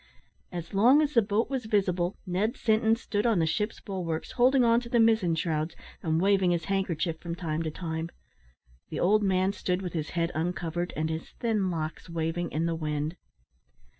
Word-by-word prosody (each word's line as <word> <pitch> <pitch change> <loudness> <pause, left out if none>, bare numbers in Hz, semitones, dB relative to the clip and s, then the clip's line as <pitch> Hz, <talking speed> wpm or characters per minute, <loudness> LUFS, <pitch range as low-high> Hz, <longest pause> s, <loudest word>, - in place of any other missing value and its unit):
As 175 -1 -6
long 240 +9 +6
as 300 0 -1
the 230 - +6
boat 210 +2 0
was 265 -3 -3
visible 185 -4 +1
Ned 195 +5 -1
Sinton 220 0 +3
stood 225 -1 -1
on 225 -4 +3
the 165 - +3
ship's 210 +7 -1
bulwarks, 175 -5 -4
holding 255 +1 +4
on 230 0 +5
to 240 -1 -9
the 240 - +2
mizzen 220 -7 +4
shrouds, 160 0 -1 0.3
and 160 -1 +1
waving 190 0 +3
his 170 -2 0
handkerchief 180 -4 -1
from 170 0 -5
time 165 -3 -2
to 160 - -2
time. 160 0 -4 0.8
The 155 - -4
old 210 +4 +4
man 190 -1 +2
stood 185 -1 -2
with 180 - -4
his 155 -3 -3
head 170 0 +1
uncovered, 175 +1 -2
and 155 +1 0
his 160 0 -5
thin 215 -5 0
locks 160 0 -4
waving 165 +1 -2
in 160 +2 0
the 170 - 0
wind. 155 0 -2
180 Hz, 190 wpm, -28 LUFS, 165-210 Hz, 0.8 s, long